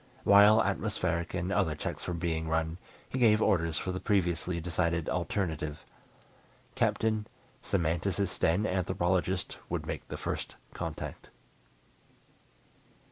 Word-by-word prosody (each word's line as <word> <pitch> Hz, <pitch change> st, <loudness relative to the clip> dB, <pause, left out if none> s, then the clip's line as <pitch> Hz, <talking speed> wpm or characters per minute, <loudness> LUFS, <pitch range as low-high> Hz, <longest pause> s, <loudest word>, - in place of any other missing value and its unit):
While 105 Hz, +2 st, +7 dB
atmospheric 85 Hz, +2 st, -1 dB
and 90 Hz, +1 st, -2 dB
other 80 Hz, -5 st, +1 dB
checks -, -, -5 dB
were 90 Hz, -, -1 dB
being 80 Hz, -2 st, -2 dB
run, 80 Hz, +1 st, 0 dB, 0.3 s
he 130 Hz, -, -3 dB
gave 110 Hz, -3 st, +5 dB
orders 85 Hz, -6 st, +2 dB
for 95 Hz, -, -2 dB
the 90 Hz, -, -3 dB
previously 90 Hz, -4 st, 0 dB
decided 85 Hz, -1 st, -1 dB
alternative. 80 Hz, -5 st, -2 dB, 0.9 s
Captain, 110 Hz, -1 st, +1 dB, 0.3 s
semanticist 95 Hz, +1 st, -1 dB
and 90 Hz, +6 st, +3 dB
anthropologist 90 Hz, 0 st, 0 dB
would -, -, -2 dB
make -, -, -5 dB
the -, -, -5 dB
First -, -, -4 dB, 0.2 s
Contact. -, -, -6 dB
90 Hz, 115 wpm, -30 LUFS, 80-100 Hz, 0.9 s, While